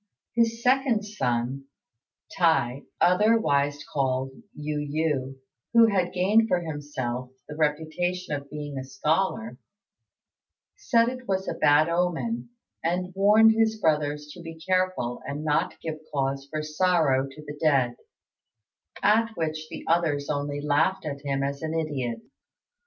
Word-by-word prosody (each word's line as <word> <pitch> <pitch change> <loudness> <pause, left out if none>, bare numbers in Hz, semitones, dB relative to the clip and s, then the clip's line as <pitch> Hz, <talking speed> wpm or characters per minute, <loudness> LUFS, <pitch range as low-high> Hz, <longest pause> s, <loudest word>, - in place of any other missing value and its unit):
His 230 0 +1
second 255 -4 +3
son, 130 - -2 0.7
T'i, 145 -7 +2
otherwise 175 -8 +3
called 135 -1 0 0.2
Yu 150 0 -3
yü, 145 -3 -1 0.4
who 230 -1 +7
had 180 -2 +1
gained 205 +5 +3
for 180 - +2
himself 135 -6 -4 0.2
the 150 - -7
reputation 160 +3 -1
of 140 -1 -5
being 145 -2 -5
a - - -5
scholar, 135 -3 -1 1.2
said 230 -2 +2
it 255 0 -5
was 190 0 -1
a - - -1
bad 145 +2 +4
omen, 180 +8 -1 0.3
and 180 +2 -1
warned 210 +3 +6
his 220 0 +1
brothers 150 -4 +1
to 175 - -11
be 165 -1 -9
careful 185 -8 0
and 145 +2 -4
not 150 -1 0
give 155 -1 -4
cause 135 -1 -1
for 155 0 -3
sorrow 155 -4 +2
to 150 +3 -12
the 145 0 -8
dead, 135 -6 +3 1.1
at 225 +2 +4
which 155 -1 -3
the - - -8
others 155 -4 +1
only 145 0 -2
laughed 150 +5 +1
at 140 -2 -4
him 140 -1 -1
as 140 0 -3
an 160 0 -3
idiot. 130 -8 -2
155 Hz, 135 wpm, -26 LUFS, 140-185 Hz, 1.2 s, who